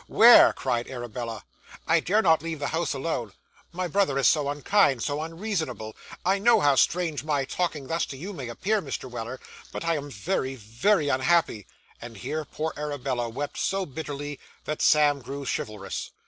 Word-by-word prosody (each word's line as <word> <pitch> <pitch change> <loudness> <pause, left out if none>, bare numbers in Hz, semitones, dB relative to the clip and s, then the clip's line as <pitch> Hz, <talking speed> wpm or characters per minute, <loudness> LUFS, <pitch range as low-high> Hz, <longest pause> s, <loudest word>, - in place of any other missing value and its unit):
where?' 235 +2 +8
cried 120 -3 -2
Arabella. 120 -2 -6 0.4
'I 165 +2 +4
dare 205 +7 +2
not 160 -3 +4
leave 165 0 -4
the 145 -1 -3
house 165 -1 -1
alone. 130 - -3 0.4
My 180 +1 -3
brother 175 -5 +1
is 135 - +4
so 145 -3 +3
unkind, 145 - +2
so 145 +1 -2
unreasonable! 160 - -4 0.3
I 195 +2 +2
know 230 +2 +5
how 145 -6 +4
strange 160 +1 +1
my 145 -3 0
talking 155 -1 -2
thus 165 +5 -1
to 135 - -8
you 190 +9 -6
may 135 -9 -6
appear, 200 - 0
Mr. 135 -3 -5
Weller, 120 +1 -6 0.3
but - - -5
I 165 -1 +1
am 145 0 -6
very, 130 +4 -2
very 130 - +1
unhappy 130 - +1 0.2
' - - -30
and 115 -2 -9
here 155 +11 -3
poor 155 +3 -4
Arabella 135 -5 -3
wept 140 +5 -5
so 195 0 0
bitterly 145 -1 -6 0.3
that 150 - -3
Sam 145 -2 +4
grew 140 +3 -6
chivalrous. 105 -4 -4
145 Hz, 175 wpm, -26 LUFS, 130-165 Hz, 0.4 s, where